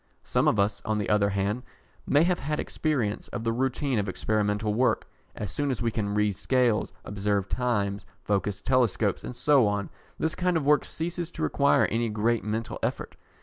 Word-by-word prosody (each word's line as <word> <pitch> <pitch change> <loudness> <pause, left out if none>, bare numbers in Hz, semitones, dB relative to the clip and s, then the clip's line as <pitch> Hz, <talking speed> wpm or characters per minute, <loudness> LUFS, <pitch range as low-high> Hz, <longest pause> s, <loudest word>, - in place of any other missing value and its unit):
Some - - +1
of - - +3
us, 100 +2 +1
on 110 -1 -1
the 105 - -2
other 105 -1 +3
hand, 100 +4 -1 0.5
may 145 +3 +4
have 180 +1 +1
had 150 +2 -2
some - - -1
experience 125 -10 -1
of 120 - -5
the 115 - +1
routine 130 0 0
of 100 -1 -1
experimental 105 +1 0
work. 125 +4 +1 0.3
As 105 -4 -5
soon 145 -1 -1
as 130 - -1
we 115 - +1
can 105 -2 -2
read 105 -1 +2
scales, 125 0 +1
observe 100 -1 -1
times, 105 -6 -1 0.2
focus 100 -1 -1
telescopes, 125 -6 +1
and 125 - -6
so 130 -1 +4
on, 100 -1 -2 0.3
this 160 - 0
kind 180 -1 +1
of 150 - -2
work 150 0 +4
ceases 170 +1 -4
to - - -5
require 140 0 +3
any 115 0 0
great 110 +2 +1
mental 110 +2 -3
effort. - - -3
110 Hz, 190 wpm, -27 LUFS, 105-135 Hz, 0.5 s, may